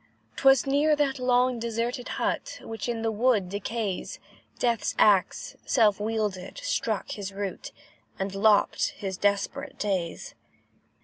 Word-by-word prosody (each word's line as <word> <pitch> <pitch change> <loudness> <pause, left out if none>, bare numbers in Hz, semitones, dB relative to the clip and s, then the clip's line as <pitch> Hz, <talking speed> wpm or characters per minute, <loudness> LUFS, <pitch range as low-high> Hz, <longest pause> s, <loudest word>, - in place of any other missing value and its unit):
'Twas 270 -2 +5
near 290 +3 +3
that 280 -2 0
long 250 -1 +2
deserted 235 +2 -2
hut, - - -2
Which 225 +1 -5
in 230 -1 -2
the 225 - +1
wood 220 -4 +2
decays, 205 0 -3 0.4
Death's 230 -4 0
axe, 195 -3 +3
self 215 -6 +3
wielded, 210 - -2
struck - - -1
his 200 -1 -5
root, 195 -1 -5 0.5
And 195 0 -3
lopped 205 +1 +3
his 190 -2 -4
desperate 200 +1 -1
days. 185 -5 -2
220 Hz, 125 wpm, -27 LUFS, 200-245 Hz, 0.5 s, Twas